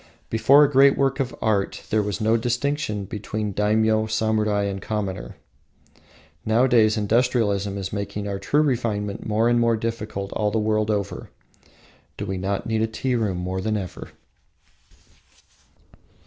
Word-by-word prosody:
Before 135 Hz, +6 st, +6 dB
a 145 Hz, -, +2 dB
great 135 Hz, 0 st, +5 dB
work 135 Hz, 0 st, +1 dB
of 130 Hz, -2 st, -2 dB
art 105 Hz, -3 st, 0 dB
there 110 Hz, -, +3 dB
was 105 Hz, -1 st, -3 dB
no 110 Hz, +1 st, +2 dB
distinction 120 Hz, -2 st, -1 dB
between 105 Hz, +1 st, -4 dB
daimyo, 110 Hz, +2 st, +2 dB
samurai, 110 Hz, -1 st, +1 dB
and 100 Hz, -1 st, -3 dB
commoner. 100 Hz, -4 st, -4 dB, 1.1 s
Nowadays 115 Hz, -1 st, +3 dB
industrialism 105 Hz, -3 st, +1 dB
is 95 Hz, -1 st, -5 dB
making 100 Hz, 0 st, -4 dB
true 145 Hz, +10 st, +2 dB
refinement 110 Hz, -7 st, -2 dB
more 110 Hz, +2 st, +2 dB
and 120 Hz, 0 st, +3 dB
more 115 Hz, -1 st, +2 dB
difficult 110 Hz, -3 st, -4 dB
all 105 Hz, -1 st, 0 dB
the 110 Hz, -, -1 dB
world 110 Hz, 0 st, 0 dB
over. 100 Hz, -2 st, -3 dB, 0.9 s
Do -, -, -4 dB
we 95 Hz, -1 st, -3 dB
not 95 Hz, +1 st, -2 dB
need 110 Hz, -1 st, 0 dB
the 110 Hz, -, +2 dB
tea 125 Hz, +4 st, -2 dB
room 105 Hz, -6 st, 0 dB
more 95 Hz, +1 st, -3 dB
than 110 Hz, +2 st, -1 dB
ever? 95 Hz, -3 st, -7 dB
110 Hz, 145 wpm, -23 LUFS, 100-115 Hz, 1.1 s, Before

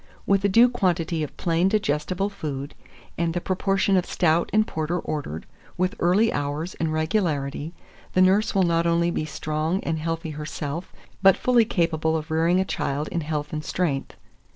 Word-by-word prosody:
With 195 Hz, -1 st, +2 dB
a 200 Hz, -, +3 dB
due 230 Hz, +5 st, +6 dB
quantity 175 Hz, -8 st, 0 dB
of 150 Hz, -, -5 dB
plain 170 Hz, +1 st, +1 dB
digestible 195 Hz, -1 st, 0 dB
food, 145 Hz, -7 st, -5 dB, 0.5 s
and 170 Hz, 0 st, 0 dB
the -, -, +1 dB
proportion 195 Hz, +2 st, +1 dB
of 180 Hz, -1 st, +1 dB
stout 170 Hz, -1 st, +2 dB
and 215 Hz, +1 st, +3 dB
porter 160 Hz, 0 st, -2 dB
ordered, 140 Hz, -, -4 dB, 0.3 s
with 185 Hz, +1 st, +1 dB
early 190 Hz, +6 st, +3 dB
hours 145 Hz, +5 st, -3 dB
and 160 Hz, -1 st, 0 dB
regularity, 155 Hz, -2 st, -1 dB, 0.4 s
the 185 Hz, -, +4 dB
nurse 200 Hz, +4 st, +3 dB
will 195 Hz, -, +4 dB
not 170 Hz, -1 st, +2 dB
only 170 Hz, 0 st, +2 dB
be 155 Hz, -, -2 dB
strong 155 Hz, +3 st, -2 dB
and 160 Hz, -1 st, -2 dB
healthy 165 Hz, 0 st, -3 dB
herself, 150 Hz, +2 st, -5 dB, 0.3 s
but 195 Hz, -1 st, +6 dB
fully 245 Hz, -2 st, +3 dB
capable 160 Hz, -5 st, 0 dB
of 160 Hz, +1 st, -7 dB
rearing 165 Hz, +3 st, +3 dB
a 190 Hz, -, +1 dB
child 145 Hz, -4 st, -2 dB
in 170 Hz, -, -2 dB
health 150 Hz, -1 st, -3 dB
and 155 Hz, 0 st, -3 dB
strength. 150 Hz, -5 st, -2 dB
165 Hz, 175 wpm, -24 LUFS, 155-185 Hz, 0.5 s, due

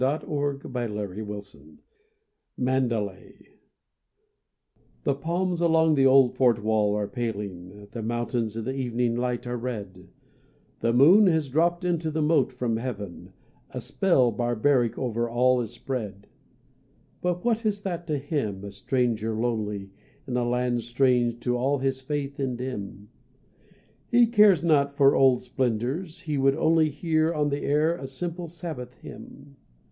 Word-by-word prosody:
THE 135 Hz, +4 st, +2 dB
CHRISTIAN 140 Hz, -7 st, -3 dB
IN 105 Hz, +1 st, -5 dB
EXILE 100 Hz, -1 st, -11 dB, 0.8 s
(Mandalay) 120 Hz, -7 st, -2 dB, 1.5 s
The 140 Hz, -, +2 dB
palms 175 Hz, +4 st, -2 dB
along 160 Hz, -1 st, +4 dB
the 135 Hz, -2 st, +4 dB
old 130 Hz, -2 st, +5 dB
fort 120 Hz, -5 st, +3 dB
wall 105 Hz, -1 st, +2 dB
are 105 Hz, -1 st, -1 dB
paling, 105 Hz, -5 st, -5 dB
The 115 Hz, -, -5 dB
mountains 115 Hz, -1 st, -2 dB
in 115 Hz, -, -4 dB
the 130 Hz, -, -2 dB
evening 120 Hz, -3 st, -1 dB
light 125 Hz, 0 st, -2 dB
are 120 Hz, 0 st, -3 dB
red, 100 Hz, -7 st, -6 dB, 0.7 s
The 115 Hz, -, +1 dB
moon 170 Hz, -, +6 dB
has 160 Hz, -5 st, +1 dB
dropped 170 Hz, +5 st, +1 dB
into 170 Hz, -2 st, 0 dB
the 155 Hz, 0 st, -1 dB
moat 150 Hz, -4 st, +2 dB
from 125 Hz, -3 st, -2 dB
heaven, 105 Hz, -7 st, -6 dB, 0.4 s
A -, -, -6 dB
spell 135 Hz, -11 st, +2 dB
barbaric 120 Hz, +2 st, +1 dB
over 120 Hz, -2 st, -1 dB
all 125 Hz, +1 st, +3 dB
is 115 Hz, -, -4 dB
spread. 105 Hz, -7 st, -5 dB, 1.0 s
But 180 Hz, +2 st, -2 dB
what 230 Hz, -1 st, +1 dB
is 205 Hz, -2 st, -1 dB
that 175 Hz, -3 st, -4 dB
to 150 Hz, -2 st, 0 dB
him, 135 Hz, -, -3 dB
a 100 Hz, -, -7 dB
stranger 115 Hz, -1 st, -1 dB
lonely, 105 Hz, -4 st, -2 dB, 0.4 s
In 125 Hz, -, -3 dB
a 125 Hz, -, +1 dB
land 125 Hz, 0 st, 0 dB
strange 120 Hz, 0 st, +1 dB
to 125 Hz, 0 st, 0 dB
all 135 Hz, +4 st, +1 dB
his 135 Hz, 0 st, -2 dB
faith 140 Hz, 0 st, -4 dB
and 130 Hz, -3 st, -2 dB
dim? 105 Hz, -5 st, -6 dB, 1.0 s
He 240 Hz, 0 st, +6 dB
cares 210 Hz, -6 st, +5 dB
not 140 Hz, -4 st, +2 dB
for 140 Hz, 0 st, +5 dB
old 130 Hz, -2 st, +4 dB
splendours, 130 Hz, -, -2 dB
he 150 Hz, -5 st, -2 dB
would 135 Hz, 0 st, +3 dB
only 160 Hz, 0 st, +3 dB
Hear 155 Hz, +2 st, 0 dB
on 150 Hz, -1 st, +1 dB
the 140 Hz, 0 st, -2 dB
air 155 Hz, +4 st, +2 dB
a 135 Hz, -5 st, -7 dB
simple 170 Hz, +5 st, -5 dB
Sabbath 155 Hz, -7 st, -7 dB
hymn. 140 Hz, 0 st, -12 dB
130 Hz, 150 wpm, -26 LUFS, 115-150 Hz, 1.5 s, moon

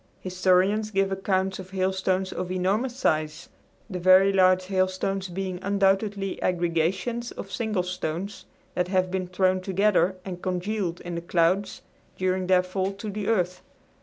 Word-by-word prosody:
Historians 185 Hz, +3 st, +2 dB
give 195 Hz, -1 st, +1 dB
accounts 190 Hz, 0 st, 0 dB
of 185 Hz, 0 st, -8 dB
hailstones 190 Hz, 0 st, 0 dB
of 180 Hz, 0 st, -4 dB
enormous 200 Hz, +7 st, 0 dB
size; 155 Hz, -7 st, -1 dB, 0.4 s
the 185 Hz, -5 st, -5 dB
very 185 Hz, +2 st, +6 dB
large 185 Hz, -1 st, +4 dB
hailstones 185 Hz, 0 st, -1 dB
being 185 Hz, 0 st, -4 dB
undoubtedly 195 Hz, 0 st, 0 dB
aggregations 180 Hz, +7 st, 0 dB
of 195 Hz, -, -8 dB
single 215 Hz, -2 st, -1 dB
stones 180 Hz, +2 st, -4 dB, 0.3 s
that 180 Hz, 0 st, 0 dB
have 185 Hz, -1 st, +1 dB
been 185 Hz, -1 st, -2 dB
thrown 185 Hz, 0 st, +1 dB
together 190 Hz, -1 st, +2 dB
and 180 Hz, -2 st, -6 dB
congealed 185 Hz, -1 st, -2 dB
in 175 Hz, -, -6 dB
the 170 Hz, -, -3 dB
clouds 175 Hz, +3 st, +1 dB, 0.3 s
during 185 Hz, 0 st, 0 dB
their 185 Hz, -1 st, +4 dB
fall 190 Hz, +1 st, -2 dB
to 205 Hz, +2 st, -6 dB
the 205 Hz, 0 st, -4 dB
earth. 180 Hz, -5 st, 0 dB
185 Hz, 145 wpm, -26 LUFS, 180-195 Hz, 0.4 s, very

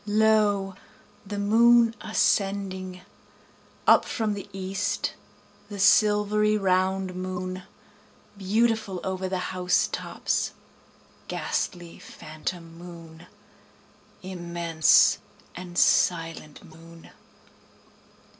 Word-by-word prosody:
Lo, 210 Hz, -2 st, +2 dB, 0.5 s
the 205 Hz, +1 st, -5 dB
moon 230 Hz, +3 st, +4 dB
ascending, 195 Hz, -3 st, -1 dB, 0.8 s
Up -, -, +6 dB
from 220 Hz, -3 st, -2 dB
the 205 Hz, 0 st, -8 dB
east 195 Hz, +1 st, -3 dB, 0.6 s
the 205 Hz, -, -7 dB
silvery 210 Hz, +1 st, +3 dB
round 190 Hz, -1 st, 0 dB
moon, 185 Hz, 0 st, -5 dB, 0.7 s
Beautiful 210 Hz, 0 st, 0 dB
over 190 Hz, 0 st, -3 dB
the 190 Hz, -, -2 dB, 0.2 s
house 180 Hz, -1 st, +1 dB
tops, -, -, -2 dB, 0.7 s
ghastly, 175 Hz, -2 st, -4 dB
phantom 165 Hz, +2 st, -8 dB
moon, 170 Hz, -2 st, -12 dB, 1.0 s
Immense 170 Hz, -3 st, +2 dB, 0.4 s
and 175 Hz, 0 st, -9 dB
silent 165 Hz, -3 st, +1 dB
moon. 165 Hz, -1 st, -15 dB
190 Hz, 80 wpm, -25 LUFS, 175-205 Hz, 1.0 s, Up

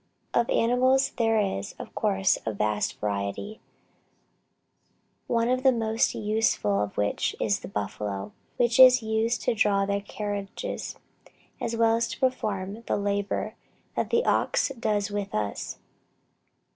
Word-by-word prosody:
Of 235 Hz, -, +2 dB
animals 255 Hz, +3 st, +3 dB
there 225 Hz, -2 st, +3 dB
is, 190 Hz, -, -2 dB
of -, -, -9 dB
course, 95 Hz, 0 st, +1 dB
a 110 Hz, -, -1 dB
vast 105 Hz, 0 st, -1 dB
variety, 100 Hz, -, -3 dB, 1.7 s
one 230 Hz, 0 st, +1 dB
of 255 Hz, +1 st, +1 dB
the 265 Hz, 0 st, +5 dB
most 225 Hz, -2 st, +1 dB
useful 210 Hz, -, +1 dB
of 105 Hz, -1 st, -4 dB
which 105 Hz, 0 st, 0 dB
is -, -, +1 dB
the -, -, -8 dB
buffalo, 100 Hz, -1 st, -4 dB, 0.3 s
which 240 Hz, 0 st, +2 dB
is 255 Hz, -2 st, +8 dB
used 220 Hz, +2 st, 0 dB
to -, -, +2 dB
draw 200 Hz, -2 st, +2 dB
their 200 Hz, 0 st, -1 dB
carriages, 205 Hz, -, -5 dB, 0.6 s
as 230 Hz, -, -2 dB
well 225 Hz, 0 st, +3 dB
as 235 Hz, 0 st, 0 dB
to -, -, -7 dB
perform 210 Hz, -5 st, -1 dB
the -, -, +1 dB
labor 200 Hz, 0 st, -1 dB, 0.4 s
that -, -, -1 dB
the 470 Hz, +1 st, +2 dB
ox -, -, +2 dB
does 215 Hz, -5 st, -1 dB
with 205 Hz, -1 st, -3 dB
us. 105 Hz, -1 st, -3 dB
215 Hz, 140 wpm, -27 LUFS, 190-235 Hz, 1.7 s, is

